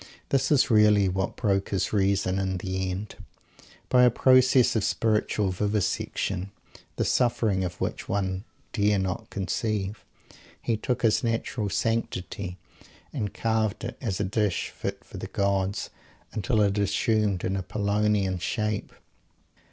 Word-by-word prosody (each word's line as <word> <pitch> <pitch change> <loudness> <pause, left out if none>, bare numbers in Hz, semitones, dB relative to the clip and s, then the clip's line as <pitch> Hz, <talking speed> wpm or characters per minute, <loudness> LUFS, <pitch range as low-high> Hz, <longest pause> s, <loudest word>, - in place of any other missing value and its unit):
This 135 0 +1
is 140 -2 +4
really 105 -2 +5
what 95 +1 -1
broke 100 -4 0
his 100 +1 -1
reason, 95 -2 +2
in 95 -1 -1
the 95 +1 -2
end. 95 +3 -5 0.7
By 125 - +4
a 125 - +7
process 130 0 +5
of 110 - +1
spiritual 105 -3 +1
vivisection 100 -1 -1 0.5
the - - 0
suffering 110 -6 +2
of 90 -1 -5
which - - -3
one 95 -1 -1 0.3
dare 105 -2 +2
not 95 -1 -3
conceive 105 0 -2 0.6
he 115 - 0
took 125 +3 -2
his 110 +1 +3
natural 115 -2 -1
"sanctity," 100 -2 -2 0.6
and 105 -9 -2
carved 110 -1 -1
it, 120 - -4
as 105 -8 -2
a - - +1
dish 100 -2 0
fit - - -5
for - - -11
the - - -5
gods, 100 0 -1 0.4
until 110 +1 +1
it 100 0 +2
assumed 105 -1 +1
an 95 - 0
Apollonian 100 0 0
shape. 105 +3 -2
105 Hz, 135 wpm, -27 LUFS, 95-110 Hz, 0.7 s, a